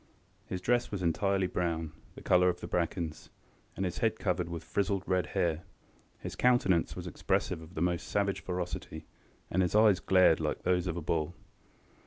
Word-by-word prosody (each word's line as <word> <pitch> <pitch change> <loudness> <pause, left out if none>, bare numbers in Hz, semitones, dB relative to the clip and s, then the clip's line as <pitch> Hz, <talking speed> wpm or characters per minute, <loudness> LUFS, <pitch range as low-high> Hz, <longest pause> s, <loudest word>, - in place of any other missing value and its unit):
His 90 - -4
dress 120 +3 +1
was 100 -3 -4
entirely 95 +3 +1
brown, 85 -3 -2 0.2
the - - -11
colour 90 0 +4
of 90 - -2
the - - -6
brackens, 85 -2 -2 0.5
and 95 - -1
his 90 - -3
head 115 -1 +1
covered 90 -3 -1
with 85 -1 -5
frizzled 100 -1 -1
red 95 -1 +1
hair. 80 -2 +1 0.6
His - - -7
countenance 120 -9 +3
was - - -6
expressive 80 - -1
of 80 +3 -13
the 80 - 0
most 90 -1 -1
savage 100 -1 0
ferocity, 90 -1 -5 0.5
and 95 - +2
his 90 +2 0
eyes 105 -3 +6
glared 95 -1 +4
like - - -2
those 90 0 +1
of 85 -1 -2
a - - -3
bull. 80 +1 -1
90 Hz, 180 wpm, -31 LUFS, 85-95 Hz, 0.6 s, eyes